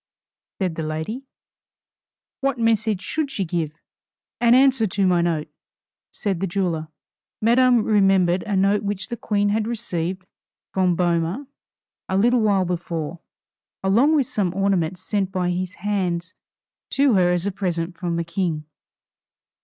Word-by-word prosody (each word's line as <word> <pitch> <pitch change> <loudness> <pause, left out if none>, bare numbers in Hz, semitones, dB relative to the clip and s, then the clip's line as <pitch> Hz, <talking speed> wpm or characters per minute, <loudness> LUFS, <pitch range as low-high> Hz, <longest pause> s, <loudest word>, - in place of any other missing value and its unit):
said 185 -4 -1
the 160 - -4
lady; 160 - -4 1.1
"What 275 -2 0
message 220 -4 +1
should 305 +5 -2
she 200 -8 -2
give?" 160 -3 -2 0.7
"An 240 0 +5
answer 260 -4 +4
to 195 +1 0
my 180 -2 +3
note," 165 -3 0 0.6
said 195 -4 -2
the 195 - -1
jeweler. 170 -4 -1 0.5
Madame 240 +1 +4
remembered 195 -4 +3
a 205 - 0
note 195 +2 +3
which 200 0 -4
the 240 - -3
Queen 205 -2 0
had 215 +1 0
received 185 -6 -3 0.5
from 185 -2 +2
Boehmer 175 - 0 0.6
a 190 - +1
little 240 +4 +4
while 200 -3 +2
before, 170 -2 -3 0.6
along 235 +11 +4
with 280 -4 +3
some 185 -6 -1
ornaments 185 -2 0
sent 195 -3 -1
by 180 -2 0
his 185 0 -3
hands 180 -3 -2 0.6
to 275 -2 +3
her 180 -3 +4
as 175 0 0
a 200 - 0
present 180 -3 -2
from 170 -1 -3
the 170 - -1
King. 165 -3 -2
190 Hz, 145 wpm, -23 LUFS, 175-215 Hz, 1.1 s, An